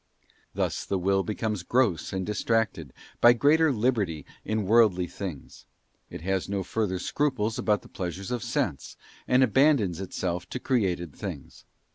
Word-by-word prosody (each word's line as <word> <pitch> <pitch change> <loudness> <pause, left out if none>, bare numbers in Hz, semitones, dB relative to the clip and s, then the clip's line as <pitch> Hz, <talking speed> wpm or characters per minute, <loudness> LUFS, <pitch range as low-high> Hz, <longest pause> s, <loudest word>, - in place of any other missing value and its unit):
Thus - - -1
the 100 - -1
Will 95 +2 +2
becomes 105 -1 -2
gross 100 - +1
and 95 -1 -2
distracted, 105 - -1 0.3
by 120 - +8
greater 150 +5 +4
liberty 105 - 0 0.2
in 110 0 -1
worldly 105 -4 +4
things. 90 -4 -8 0.4
It - - -8
has 95 +2 -1
no 100 -1 -1
further 100 -2 -1
scruples 115 0 -1
about 105 -1 +1
the - - -13
pleasures 95 +3 -5
of 120 -2 -2
sense, 70 -7 -2 0.3
and 130 +1 +4
abandons 120 - +3
itself 90 -1 -3
to 125 - -4
created 90 - -1
things. - - -8
100 Hz, 145 wpm, -27 LUFS, 90-120 Hz, 0.4 s, by